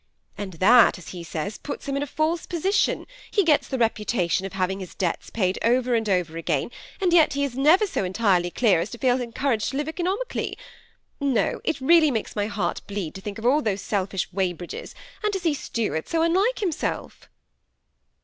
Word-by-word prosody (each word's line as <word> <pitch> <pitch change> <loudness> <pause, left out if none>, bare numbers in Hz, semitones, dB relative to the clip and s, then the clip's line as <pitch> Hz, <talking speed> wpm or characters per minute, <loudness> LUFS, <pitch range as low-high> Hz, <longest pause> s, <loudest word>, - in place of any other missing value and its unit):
And 200 -2 -6
that, 215 +9 +6
as 180 - -11
he 175 -2 -7
says, 170 +5 -4
puts 290 - -6
him 275 - -1
in 280 - -1
a 290 - -2
false 310 +4 -1
position; 365 +4 +1 0.2
he 405 - +2
gets 310 -4 +3
the 265 - -2
reputation 210 -5 0
of 195 - -12
having 190 0 -1
his 185 -2 -8
debts 180 -3 -2
paid 185 -4 0
over 245 +1 +2
and 225 -2 +1
over 175 -4 0
again; 165 - -1 0.3
and 365 -3 +2
yet 325 -3 +5
he 280 0 0
is 275 -4 -2
never 310 +10 +5
so 380 - -2
entirely 185 -2 +2
clear 205 -2 +3
as 175 +5 -2
to 240 - -8
feel 250 0 +2
encouraged 235 -1 -1
to 270 - -4
live 295 +1 -2
economically. 370 +9 -2 0.6
No, 275 -5 0
it 320 - -1
really 315 +3 +5
makes 225 -5 -3
my 205 -1 0
heart 205 -5 -2
bleed 200 -6 -4
to 190 - -9
think 205 +1 -6
of 225 - -7
all 280 +5 +4
those 200 -6 -1
selfish 195 -2 -1
Weybridges, 180 -2 -3 0.3
and 425 - +1
to 385 - -1
see 335 -4 +1
Stuart 220 - -3
so 325 -1 +1
unlike 385 +9 +2
himself." 360 -7 -3
230 Hz, 195 wpm, -24 LUFS, 190-300 Hz, 0.6 s, that